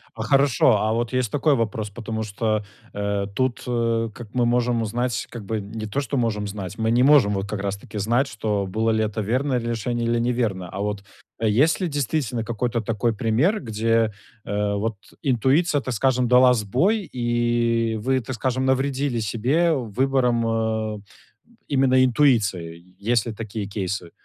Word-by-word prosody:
А 110 - -6
хорошо, 130 -2 +4
а 110 +1 +1
вот 120 +1 -1
есть 130 -4 0
такой 145 0 +2
вопрос, 110 -2 -2
потому 110 +1 -5
что, 110 0 -1 0.3
э, 100 -1 -1
тут, 130 -2 -1
э, 115 -1 0
как 120 +1 -9
мы 125 -1 +3
можем 120 -1 +1
узнать, 120 +1 -2
как 115 -3 -7
бы 110 +2 -2
не 110 +2 -6
то, 135 +7 -1
что 140 0 -3
можем 105 -4 0
знать, 100 -1 -6
мы 110 0 0
не 120 +1 +3
можем 130 -6 +5
вот 95 0 -2
как 105 -2 -3
раз 100 0 -2
таки 100 - -10
знать, 120 +7 +1
что 105 -5 -2
было 110 +4 0
ли 110 0 +1
это 110 0 -2
верное 130 +5 0
решение 120 0 -2
или 115 0 +1
неверное. 115 -7 -1
А 95 +3 -6
вот 105 -1 -3 0.4
есть 115 - +3
ли, 180 - +1
действительно, 140 -5 -1
какой-то 120 +1 -1
такой 115 +1 0
пример, 125 - +1
где, 115 -1 0 0.3
э, 105 0 -1
вот 110 +2 -2 0.3
интуиция, 140 +4 +2
так 130 - -4
скажем, 125 +1 +2
дала 125 +1 +6
сбой 135 - 0
и 120 -1 +1
вы, 130 +5 0
так 130 +1 -5
скажем, 130 +2 -1
навредили 135 -1 0
себе 125 - +1
выбором, 125 -1 +1 0.5
э, 105 - -9 0.7
именно 130 -2 +3
интуиции? 105 - +1
Есть 115 +1 +1
ли 115 - -4
такие 110 -1 -5
кейсы? 100 -3 -4
115 Hz, 170 wpm, -23 LUFS, 105-130 Hz, 0.7 s, дала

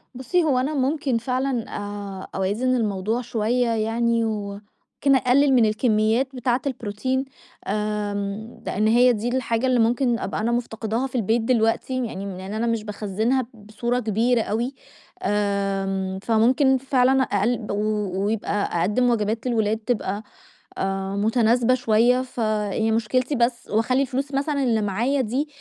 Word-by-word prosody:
بُصّي 260 +8 0
هو 275 -5 +2
أنا 285 +4 -1
ممكن 275 -2 0
فعلًا 250 0 -2
آآ 205 -2 -6
أوازن 210 +7 0
الموضوع 215 +1 -1
شوية 240 +1 0
يعني، 230 +1 +1
وممكن 210 +6 -2
أقلّل 265 +2 +4
من 240 -3 +5
الكميات 220 +4 +1
بتاعة 245 0 0
البروتين، 255 +2 -2 0.4
آمم 210 +1 -3
لإن 215 +2 0
هي 245 +2 +5
دي 220 +1 -3
الحاجة 245 -1 0
اللي 255 -1 +2
ممكن 235 +1 +2
أبقى 200 - -3
أنا 230 +2 0
مفتقداها 235 +1 -2
في 260 - -11
البيت 230 0 +1
دلوقتي، 240 +2 +1
يعني 200 -3 -6
لإن 190 +2 -7
أنا 225 +2 -1
مش 230 -2 0
باخزّنها 220 +4 -1
بصورة 225 +3 -3
كبيرة 230 +2 +1
أوي، 235 +5 -2 0.5
آمم، 195 -2 -1
فممكن 255 +4 +3
فعلًا 265 0 +2
أقل 215 +1 0
و - - -1 0.5
ويبقى 205 -4 -1
أقدّم 245 +7 +2
وجبات 225 +1 0
للولاد 220 -2 +1
تبقى 215 -2 -2 0.5
آآ 195 0 -2
متناسبة 230 +3 +3
شوية، 245 +1 +3
فهي 220 -3 -1
مشكلتي 250 +5 0
بس 235 0 0
واخلّي 235 +5 +2
الفلوس 275 +1 -2
مثلًا 280 0 0
اللي 225 -4 +2
معايا 235 +8 0
دي 260 +6 -1
230 Hz, 140 wpm, -23 LUFS, 210-255 Hz, 0.5 s, من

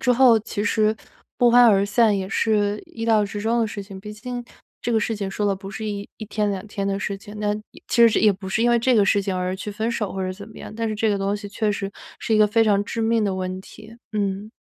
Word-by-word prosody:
之 250 -2 +3
后 245 -2 +6
其 205 -1 -4
实 215 +1 +2 0.4
不 245 -1 +5
欢 245 +1 +7
而 200 -2 +5
散 215 -1 +3
也 190 0 -3
是 210 -1 +1
意 225 -1 -6
料 220 -2 +3
之 205 +1 -5
中 230 +2 +1
的 225 - +2
事 205 -1 -6
情。 195 -1 -10
毕 210 +1 -8
竟 245 +3 -6 0.4
这 240 - -1
个 220 - +4
事 225 +1 -1
情 200 -2 -4
说 205 +1 -1
的 200 - +2
不 195 +1 -9
是 220 - -6
一 205 -1 -4
一 215 - -7
天 210 0 -1
2 195 +1 -4
天 200 -1 -4
的 195 0 -1
事 200 0 -3
情， 205 +1 -12
那 210 0 0 0.2
也 - - -17
其 235 -1 +6
实 - - +1
也 210 -2 +5
不 190 0 -8
是 220 +4 0
因 240 - +4
为 240 - +4
这 250 +2 +2
个 205 - +5
事 200 +1 +2
情 190 -2 -2
而 180 0 -1
去 205 +2 -6
分 220 +3 -2
手 210 -4 -2
或 190 - -4
者 185 - -2
怎 200 +2 -10
么 - - -13
样， - - -9
但 230 0 -2
是 215 - -2
这 220 +1 +1
个 205 - +2
东 200 +1 0
西 205 -1 -8
确 210 +1 -1
实 200 -1 -3 0.3
是 220 - 0
一 - - +4
个 215 - +6
非 225 +2 +3
常 205 -1 +3
致 230 - -4
命 225 0 +2
的 195 -2 0
问 185 0 -4
题。 215 +3 -14 0.2
嗯。 200 0 -2
210 Hz, 310 characters per minute, -23 LUFS, 200-225 Hz, 0.4 s, 欢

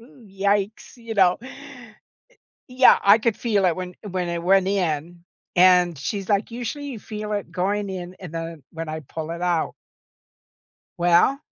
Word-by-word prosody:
"Ew, 235 0 -18
yikes." 200 +4 -1
You 230 -2 -7
know? 185 -3 +4
Eh, 260 - -9 1.2
yeah. 255 0 +6
I 200 +3 +7
could 225 -1 0
feel 205 -5 +1
it 170 - +2
when 180 -1 -6 0.2
when 180 -1 -2
it 170 0 -3
went 190 +1 +4
in 175 -3 -2 0.3
and 180 -1 +5
she's 195 +8 -4
like, 200 +2 +1
"Usually, 245 +5 -5
you 240 -6 -6
feel 210 0 -6
it 205 -1 -4
going 200 +2 -1
in 180 0 -7
and 180 -4 -9
then 165 -3 -6
when 165 -1 -6
I 155 0 -5
pull 160 +3 -7
it 170 +1 -6
out." 175 -3 0 1.3
Well, 175 - +4
190 Hz, 165 wpm, -23 LUFS, 175-210 Hz, 1.3 s, I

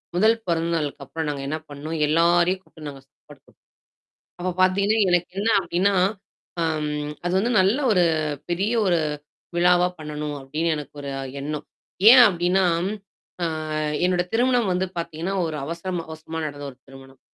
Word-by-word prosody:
1 220 +5 +4
பிறந்த 170 0 0
நாளுக்கு 145 -2 -4
அப்பறம் 160 +2 -4
நாங்க 140 -2 -4
என்ன 155 +3 -2
பண்ணோம்? 150 +3 -5
எல்லாரையும் 175 +3 +3
கூப்பிட்டு 155 -5 -12
நாங்க 135 -1 -11
சாப்பாடு 145 0 -18
குடுத்தோம். - - -25 0.8
அப்ப 185 +1 -1
பார்த்தீங்கன்னா, 200 +4 +3
எனக்கு 175 0 +1
என்னா 225 +2 +2
அப்படின்னா, 185 +3 +1 0.7
ஆ, - - +1 0.6
அது 175 - -1
வந்து 230 +5 +1
நல்ல 195 +6 +3 0.2
ஒரு 180 - +4 0.5
பெரிய 195 +6 0
ஒரு, 175 -2 +3 0.6
விழாவா 180 0 +4
பண்ணணும் 150 -1 -5
அப்படின்னு 150 +5 -2
எனக்கு 150 -1 -8
ஒரு 140 -1 -5 0.3
எண்ணம். 150 +1 -4 0.4
ஏன் 255 0 +10
அப்படின்னா, 180 +1 +1 0.8
ஆ, - - +2 0.6
என்னோட 180 -1 +2
திருமணம் 240 -3 +2
வந்து 180 +1 0
பாத்தீங்கன்னா, 165 +3 -3
ஒரு 155 -1 -4
அவசரமா 170 +2 -4
அவசரமா 160 +1 -6
நடந்த 145 -1 -7
ஒரு 125 - -24
திருமணம். 135 0 -14
170 Hz, 150 wpm, -23 LUFS, 150-185 Hz, 0.8 s, ஏன்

